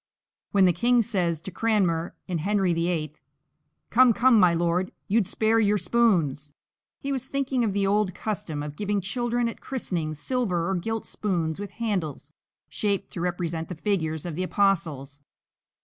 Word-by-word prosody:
When 195 -2 +4
the 180 - +4
king 240 +7 +3
says 175 -7 -1
to 190 - -6
Cranmer 180 -6 0
in 175 -3 -2
"Henry 195 +1 +1
VIII:" 165 -3 -1 0.8
"Come, 245 0 +6
come, 240 0 +5
my 180 -3 +6
lord, 175 +2 0 0.2
you'd 210 -1 +2
spare 225 +1 +2
your 210 -1 +3
spoons," 170 - +1 0.4
he 280 - -4
was 260 -1 -3
thinking 270 -3 0
of 210 -4 0
the 200 0 +1
old 200 -2 +1
custom 160 -9 -3
of 150 0 -6
giving 205 +2 -1
children 240 +4 -1
at 230 - -6
christenings 170 - -3
silver 180 - -1
or 195 - 0
gilt 225 +5 -2
spoons 170 -6 -2
with 200 -2 -6
handles 180 - -3 0.4
shaped 200 -2 -2
to 175 - -4
represent 170 -2 -2
the 180 - -5
figures 160 -4 -1
of 175 - -4
the 175 - -3
Apostles. 165 -8 0
190 Hz, 165 wpm, -26 LUFS, 165-220 Hz, 0.8 s, Come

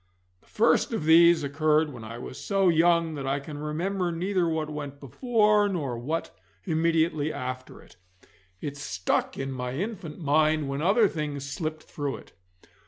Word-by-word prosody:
The - - -30
first 230 +2 +2
of 220 - -2
these 165 0 +6
occurred 150 +1 +1
when 120 -2 -9
I 115 +2 -7
was 125 - -8
so 195 -2 +2
young 170 0 +3
that 140 -3 -5
I 135 +1 0
can 145 +1 -8
remember 175 +5 -2
neither 180 +1 0
what 160 -1 -1
went 145 -2 -6
before 210 - +2
nor 145 -10 -2
what 145 +8 -4 0.3
immediately 160 -2 +1
after 130 -2 -6
it. - - -20 0.6
It 145 -1 -5
stuck 90 -10 -1
in 135 0 -3
my 125 -1 -4
infant 185 - -5
mind 155 -1 +2
when 140 +1 -3
other 205 +6 +4
things 145 -5 -4
slipped 155 +2 -4
through 145 -2 -4
it. - - -16
155 Hz, 165 wpm, -27 LUFS, 140-170 Hz, 0.6 s, these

